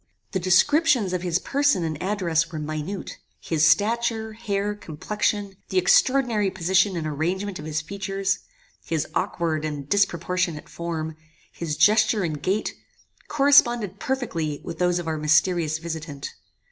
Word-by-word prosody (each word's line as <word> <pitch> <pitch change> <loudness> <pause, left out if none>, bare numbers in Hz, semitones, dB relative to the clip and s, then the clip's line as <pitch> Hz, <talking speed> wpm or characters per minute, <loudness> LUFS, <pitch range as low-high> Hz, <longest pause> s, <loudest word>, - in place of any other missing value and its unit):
"The 190 - -1
descriptions 225 - +3
of 180 - -1
his 175 -2 +1
person 280 -2 +1
and 155 -2 -3
address 175 -4 0
were 160 - -5
minute. 155 +5 -5 0.2
His 155 -1 +2
stature, 220 +5 +1
hair, 210 -2 -2
complexion, 205 +2 -3
the 190 - -1
extraordinary 225 +2 +3
position 190 +1 +1
and 160 - -3
arrangement 180 +6 -2
of 150 - -8
his 155 0 -2
features, 195 +3 -2 0.4
his 160 -3 -1
aukward 165 -3 -1
and 145 -3 -4
disproportionate 180 -3 0
form, 160 -2 -4 0.3
his 155 -3 -4
gesture 215 -1 +4
and 155 -4 -3
gait, 195 +6 -1 0.5
corresponded 240 -8 +4
perfectly 195 - -2
with 165 - -7
those 180 -1 +2
of 175 -2 -4
our 160 -1 -2
mysterious 160 +1 +2
visitant. 155 -3 -6
180 Hz, 135 wpm, -24 LUFS, 160-205 Hz, 0.5 s, gesture